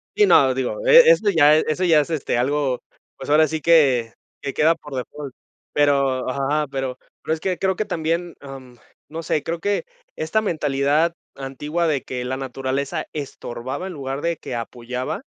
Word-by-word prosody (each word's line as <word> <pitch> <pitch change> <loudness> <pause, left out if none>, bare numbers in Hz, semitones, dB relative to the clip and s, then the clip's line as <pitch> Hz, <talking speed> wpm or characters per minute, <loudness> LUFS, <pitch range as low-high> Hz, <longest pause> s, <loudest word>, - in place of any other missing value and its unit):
Y 420 - +5
no, 135 - +5
digo, 130 - -3
e 485 0 +8
eso 220 - +3
ya 155 -5 +6
eso 155 +3 0
ya 165 -4 +5
es, 145 - -6
este, 155 -6 -1
algo, 135 0 0 0.4
pues, 135 - -8
ahora 155 +1 +5
sí 160 +1 -4
que 135 -8 +4 0.3
que 140 - -4
queda 160 +2 +3
por 150 -4 -10
default. 135 +2 -6 0.4
Pero 140 -3 +2
ajá, 140 +3 0
pero 135 -1 -3 0.2
pero - - -1
es 160 - -3
que 185 +1 -2
creo 190 -1 +1
que 215 - -2
también, 165 +1 -2
am, 135 -3 -11 0.3
no 160 +2 -5
sé, 155 -2 -1
creo 165 0 -3
que 205 +4 -1 0.3
esta 160 +8 0
mentalidad 150 -2 +1 0.2
antigua 145 +5 -3
de 145 -4 0
que 125 -1 -5
la 130 +1 -3
naturaleza 135 +1 -3
estorbaba 135 +1 -6
en 190 - -6
lugar 135 -2 -5
de 170 0 -1
que 125 - -6
apoyaba 125 - -5
145 Hz, 180 wpm, -22 LUFS, 135-165 Hz, 0.4 s, e